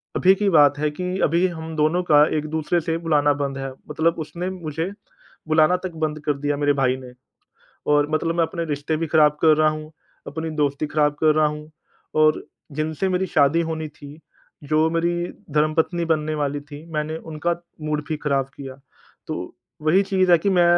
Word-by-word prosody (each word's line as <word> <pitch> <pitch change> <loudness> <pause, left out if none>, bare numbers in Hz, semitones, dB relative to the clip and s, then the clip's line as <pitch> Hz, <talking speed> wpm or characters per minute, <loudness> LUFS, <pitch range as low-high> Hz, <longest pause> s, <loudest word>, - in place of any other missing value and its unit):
अभी 190 +1 +5
की 205 0 +1
बात 145 -4 +5
है 150 - +1
कि 180 +4 -3
अभी 170 +4 +3
हम 160 -2 -7
दोनों 155 +3 +2
का 150 -3 +6
एक 150 - -2
दूसरे 160 +3 +1
से 165 0 -1
बुलाना 145 -2 +3
बंद 135 -1 -2
है 135 0 -4 0.2
मतलब 165 +1 +1
उसने 170 +4 -4
मुझे 165 0 -4 0.6
बुलाना 155 +2 +4
तक 185 - -3
बंद 155 0 -4
कर 150 - +2
दिया 145 0 -1
मेरे 145 0 +2
भाई 130 -1 +2
ने 125 -1 -11 0.8
और 145 0 +3
मतलब 165 +2 0
मैं 170 - +3
अपने 170 +1 -4
रिश्ते 150 +1 -2
भी 165 - -2
ख़राब 150 -1 +4
कर 155 -2 +6
रहा 155 0 +4
हूँ, 155 0 -6 0.4
अपनी 160 0 -4
दोस्ती 145 0 0
ख़राब 150 -1 +1
कर 155 -1 +5
रहा 155 - +4
हूँ 150 0 -6 0.5
और 155 0 +3 0.3
जिनसे 160 +4 -1
मेरी 185 0 0
शादी 155 +1 +3
होनी 160 -1 -3
थी, 150 0 -13 0.4
जो 155 +2 +2
मेरी 170 +1 0 0.3
धर्मपत्नी 160 +3 +1
बनने 155 -1 0
वाली 145 -1 -1
थी, 145 +2 -11
मैंने 155 +1 -2
उनका 165 +2 -3 0.3
मूड 150 0 -1
भी 155 - -1
ख़राब 140 -3 0
किया। 135 -2 -8 0.5
तो - - -5 0.3
वही 180 +6 +4
चीज़ 190 -2 +2
है 170 - +8
कि 200 +5 0
मैं 180 -2 +4
155 Hz, 190 wpm, -22 LUFS, 150-165 Hz, 0.8 s, है